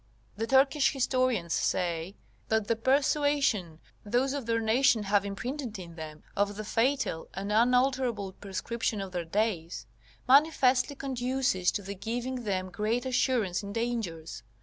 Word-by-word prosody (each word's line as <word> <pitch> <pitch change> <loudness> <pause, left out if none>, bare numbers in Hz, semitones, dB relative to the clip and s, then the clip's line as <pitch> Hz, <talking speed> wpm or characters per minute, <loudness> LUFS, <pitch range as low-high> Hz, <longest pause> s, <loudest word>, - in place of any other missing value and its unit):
The 225 +3 -3
Turkish 270 +3 +4
historians 255 - +1
say, 175 +1 -1 0.3
that 220 -2 +1
the 230 - +2
persuasion 270 - +1 0.3
those 245 +5 +1
of 280 -5 -4
their 230 0 +1
nation 225 0 +3
have 200 0 +2
imprinted 230 +4 -4
in 175 -3 -9
them 155 -2 -9
of 205 0 0
the 215 - -5
fatal 230 -7 0
and 195 +2 -4
unalterable 245 -2 +2
prescription 205 +3 -3
of 195 -1 -5
their 175 -2 -3
days, 165 - -1 0.4
manifestly 275 -1 +4
conduces 255 -7 0
to 205 - -3
the 200 +2 -5
giving 240 +5 -4
them 185 -2 -2
great 220 +7 -1
assurance 245 -7 +1
in 200 0 -7
dangers. 220 - -3
225 Hz, 140 wpm, -29 LUFS, 195-255 Hz, 0.4 s, Turkish